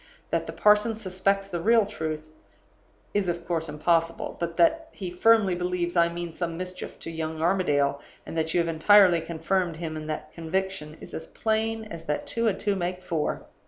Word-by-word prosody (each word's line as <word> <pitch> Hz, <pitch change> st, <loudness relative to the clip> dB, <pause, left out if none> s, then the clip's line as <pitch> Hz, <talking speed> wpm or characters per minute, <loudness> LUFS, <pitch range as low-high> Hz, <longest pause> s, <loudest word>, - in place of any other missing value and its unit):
That -, -, 0 dB
the -, -, -4 dB
parson 210 Hz, +1 st, +4 dB
suspects 195 Hz, -1 st, 0 dB
the 175 Hz, -3 st, -4 dB
real 225 Hz, +2 st, +5 dB
truth 155 Hz, -6 st, -5 dB, 0.8 s
is 205 Hz, -3 st, +1 dB
of 170 Hz, 0 st, -3 dB
course 165 Hz, -2 st, -1 dB
impossible. 165 Hz, +2 st, 0 dB
But 170 Hz, -1 st, -3 dB
that 320 Hz, -, +3 dB
he 185 Hz, -3 st, -6 dB
firmly 205 Hz, +1 st, +4 dB
believes 180 Hz, 0 st, -1 dB
I 170 Hz, -1 st, +4 dB
mean 170 Hz, -1 st, -5 dB
some 170 Hz, -1 st, -3 dB
mischief 185 Hz, 0 st, -6 dB
to 165 Hz, -, -6 dB
young 160 Hz, -1 st, -4 dB
Armadale, 145 Hz, -5 st, +2 dB, 0.2 s
and -, -, -7 dB
that 160 Hz, 0 st, 0 dB
you 175 Hz, -, +2 dB
have 170 Hz, -, -2 dB
entirely 175 Hz, +2 st, +6 dB
confirmed 170 Hz, +1 st, -1 dB
him 160 Hz, -1 st, -5 dB
in 155 Hz, 0 st, -6 dB
that 155 Hz, -, -5 dB
conviction, 165 Hz, -2 st, -3 dB
is -, -, -11 dB
as 160 Hz, -, -6 dB
plain 220 Hz, 0 st, -1 dB
as 170 Hz, -5 st, -9 dB
that 150 Hz, -, -2 dB
two 230 Hz, 0 st, 0 dB
and 195 Hz, -3 st, 0 dB
two 205 Hz, -1 st, 0 dB
make 180 Hz, 0 st, -3 dB
four. 170 Hz, -4 st, -2 dB
175 Hz, 190 wpm, -26 LUFS, 165-195 Hz, 0.8 s, entirely